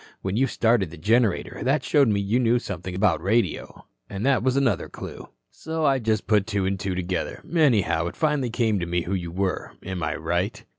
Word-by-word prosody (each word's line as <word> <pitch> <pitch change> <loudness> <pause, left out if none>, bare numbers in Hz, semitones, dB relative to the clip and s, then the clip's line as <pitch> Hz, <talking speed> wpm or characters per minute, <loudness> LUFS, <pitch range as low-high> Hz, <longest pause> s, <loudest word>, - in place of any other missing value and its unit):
When 95 +1 -2
you 135 +4 +2
started 115 -6 +2
the 85 - -11
generator 110 -2 +1
that 135 +1 +1
showed 145 -4 +3
me 105 -2 +2
you 100 +5 +1
knew 120 -1 +3
something 90 -5 -5
about 95 -2 +2
radio, 100 -2 -1 0.2
an' 100 +1 -5
that 135 +1 +3
was 130 +2 +1
another 130 -6 +1
clue. - - -9 0.2
"So 160 0 -3
I 135 -2 +3
just 110 -3 0
put 105 0 +2
two 100 -3 -1
an' 95 0 -1
two 95 -2 -2
together. 90 -1 -3
Anyhow, 115 - +3
it - - -6
finally 150 -5 0
came 110 -3 +1
to 85 - -3
me 85 0 0
who 90 - -3
you 90 -3 -2
were. 95 +1 -2
Am 95 -2 -4
I 75 -2 -1
right?" - - -2
105 Hz, 210 wpm, -24 LUFS, 95-125 Hz, 0.2 s, showed